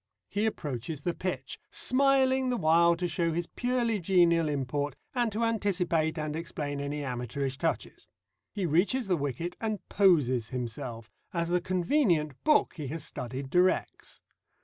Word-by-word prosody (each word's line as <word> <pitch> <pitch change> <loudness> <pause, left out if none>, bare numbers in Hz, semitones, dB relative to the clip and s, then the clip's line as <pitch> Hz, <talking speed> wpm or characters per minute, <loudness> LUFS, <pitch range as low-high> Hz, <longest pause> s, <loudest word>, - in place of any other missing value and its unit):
He 205 +2 0
approaches 145 - -4
the 175 - 0
pitch, 185 +1 -4
smiling 265 -1 +3
the 245 - 0
while 170 0 +4
to 175 +1 -2
show 170 0 0
his 170 +1 -1
purely 240 0 -1
genial 170 -3 +3
import 145 0 -2 0.2
and 240 -3 +1
to 220 +3 -1
anticipate 180 -8 +1
and 155 -1 -3
explain 150 -3 -4
any 145 +1 -3
amateurish 130 +1 -3
touches. 165 -1 -3 0.4
He 200 -3 -2
reaches 195 - +2
the 185 - +3
wicket 145 +4 -3
and 215 -2 -3
poses 135 - +3
himself, 120 -2 -5 0.2
as 170 0 0
the 175 0 +2
convenient 175 - +1
book 305 -1 +4
he 150 -3 -4
has 155 +3 -5
studied 130 0 -6
directs. 180 +1 0
170 Hz, 150 wpm, -29 LUFS, 145-200 Hz, 0.4 s, while